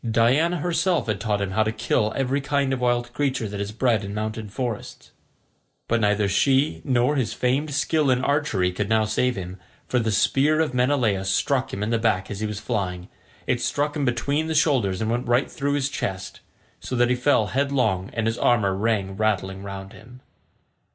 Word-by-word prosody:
Diana 130 +10 +3
herself 175 +1 +1
had 105 -3 -2
taught 105 -3 0
him 100 -1 -2
how 110 +3 +1
to 110 0 +1
kill 110 -1 0
every 135 +1 0
kind 140 -1 0
of 130 - -3
wild 120 0 0
creature 130 -5 -1
that 100 0 -6
is 100 0 -4
bred 115 -2 +1
in 100 +1 -6
mountain 110 0 -4
forests, 120 0 -5 0.8
but 115 0 +1
neither 105 -1 +2
she 135 +9 +2
nor 130 +1 +2
his 130 -4 -1
famed 135 +5 0
skill 150 0 +1
in 125 0 +2
archery 140 -11 +1
could 100 +3 -3
now 110 -1 +3
save 125 +4 0
him, 95 0 -7 0.3
for 125 - +1
the 110 -1 0
spear 145 +8 +2
of 160 -5 0
Menelaus 125 -7 +1
struck 130 +5 0
him 100 - -3
in 110 - -2
the 115 - +1
back 110 -4 0
as 100 - -5
he 110 - -1
was 105 -1 -5
flying; 95 -4 -3 0.4
it 120 -1 0
struck 145 +1 -1
him 150 - -1
between 140 +5 0
the 160 - -2
shoulders 125 - +2
and 110 0 0
went 120 +1 -2
right 120 +3 +2
through 140 0 -1
his 140 -2 +1
chest, 95 -8 -4 0.4
so 130 - -5
that 120 0 +3
he - - +3
fell 125 -3 +2
headlong 125 -9 0
and 115 -2 -1
his 115 0 -1
armour 105 -5 +2
rang 100 -1 -1
rattling 95 -2 -1
round 100 -1 -8
him. 125 +3 -15
120 Hz, 200 wpm, -24 LUFS, 105-135 Hz, 0.8 s, Diana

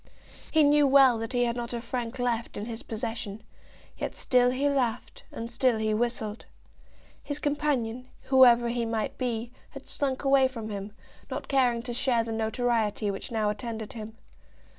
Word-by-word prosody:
He 315 -1 +4
knew 290 0 +5
well 265 -4 +6
that 225 +3 -4
he 245 0 +2
had 235 0 -1
not 240 0 -4
a - - -2
franc 240 +1 -4
left 240 -2 -2
in 205 - -4
his 230 0 -6
possession, 220 -2 -5 0.6
but - - -3
still 250 -1 +3
he 265 +3 0
laughed 250 -5 -1
and 230 +1 -6
still 245 -1 +2
he 215 0 0
whistled. 220 -1 -2 0.8
His 290 - -4
companion, 270 -5 -1 0.2
whoever 240 -3 +6
he 235 0 -1
might 225 -1 -2
be, 240 -2 -2 0.2
had 275 -1 -11
slunk 270 -2 -2
away 270 -1 +5
from 230 -4 -7
him, 200 0 -5 0.4
not - - -5
caring 245 -4 +2
to 245 -1 -5
share 245 -2 +1
the 225 - -5
notoriety 220 -2 0
which 195 - -6
now 215 -2 +1
attended 220 +1 -6
him. 220 -1 -8
235 Hz, 170 wpm, -28 LUFS, 225-260 Hz, 0.8 s, well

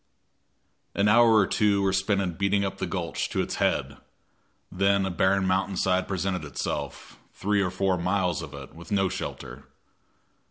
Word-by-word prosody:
An 100 +1 +2
hour 115 +1 +6
or 105 -2 +5
two 100 0 +1
were 95 -1 +1
spent 95 +1 +1
in 90 -3 -2
beating 100 +3 +1
up 95 - -5
the - - -2
gulch - - -3
to - - -3
its - - -5
head. - - 0 0.7
Then 100 +1 +2
a 95 - -2
barren 95 +2 +2
mountain 95 +1 0
side 95 -1 +1
presented 95 -2 -2
itself, 75 - -5 0.2
three 100 +1 0
or 95 - 0
four 90 0 0
miles 90 -1 0
of 75 -3 -8
it, 70 -2 -10
with 85 +4 -13
no 95 -2 +2
shelter. 65 -4 -7
95 Hz, 170 wpm, -26 LUFS, 90-100 Hz, 0.7 s, hour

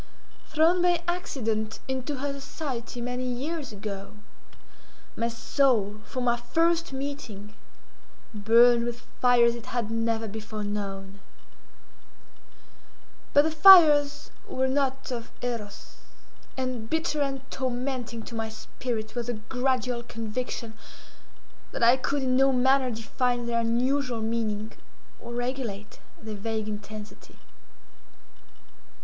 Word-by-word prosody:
Thrown 325 +3 +3
by 350 -1 +3
accident 225 -11 -2
into 265 +2 -2
her 280 +1 -3
society 270 -4 -5
many 250 +1 -3
years 280 +4 -3
ago, 200 -1 -6 1.0
my 230 - 0
soul 230 -3 +1
from 255 -2 -3
our 240 0 +2
first 330 +6 +1
meeting, 265 -7 -6 0.8
burned 235 +3 +5
with 240 0 -4 0.2
fires 240 -1 +5
it 235 0 -9
had 235 -3 -2
never 225 0 0
before 215 0 -6
known; 200 -1 -5 2.1
but 290 - +6
the 320 - 0
fires 310 -4 +7 0.2
were 260 0 0
not 270 0 0
of 235 -2 -4
Eros, 225 -4 -5 0.6
and 255 -4 -3
bitter 320 -2 0
and 270 -1 -2
tormenting 250 -2 -3
to - - -10
my 225 -1 -2
spirit 220 0 -5
was 240 -1 -3
the 245 - -1
gradual 250 +1 -1
conviction 230 0 -5 1.0
that - - -2
I 235 +2 +7
could 275 +1 -1
in 255 -1 +2
no 270 +1 +5
manner 260 +1 +3
define 240 +2 -1
their 235 0 0
unusual 245 +1 0
meaning 220 -1 -2 0.5
or 235 - -8
regulate 245 -5 -4 0.2
their 220 -1 -7
vague 220 +1 -3
intensity. 210 0 -8
240 Hz, 115 wpm, -27 LUFS, 220-270 Hz, 2.1 s, fires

